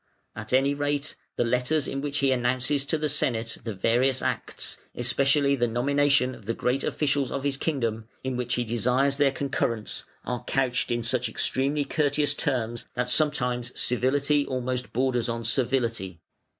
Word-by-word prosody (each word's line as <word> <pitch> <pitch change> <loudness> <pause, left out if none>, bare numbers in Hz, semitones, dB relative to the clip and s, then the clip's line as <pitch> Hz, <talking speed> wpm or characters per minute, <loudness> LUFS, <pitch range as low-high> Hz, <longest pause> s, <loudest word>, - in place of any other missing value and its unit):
At 105 0 -6
any 135 +2 +3
rate, 145 +1 -1 0.2
the - - +1
letters 125 +5 +1
in 135 - -3
which 145 0 -2
he 135 - +4
announces 130 +3 +1
to 160 - +1
the 150 0 -1
Senate 115 -6 0
the 110 -3 -4
various 125 +6 +2
acts, - - -3 0.2
especially 140 +3 +2
the 120 -2 +1
nomination 140 +2 +2
of 105 - -14
the 115 - -1
great 130 +3 0
officials 140 -3 0
of 140 - -3
his 140 -1 0
kingdom, 115 -7 -2 0.2
in 130 -1 -2
which 125 -1 -1
he 120 - 0
desires 125 +4 +1
their 145 -1 +4
concurrence, 125 -5 -2 0.2
are 125 0 -3
couched 130 -2 +1
in 120 0 0
such 120 0 +1
extremely 140 +5 0
courteous 145 -1 +1
terms, 120 -5 -1
that 125 0 -1
sometimes 125 -4 0
civility 140 +4 +2
almost 125 -1 -3
borders 125 -1 0
on 115 0 -3
servility. 115 -7 0
130 Hz, 165 wpm, -26 LUFS, 120-140 Hz, 0.2 s, he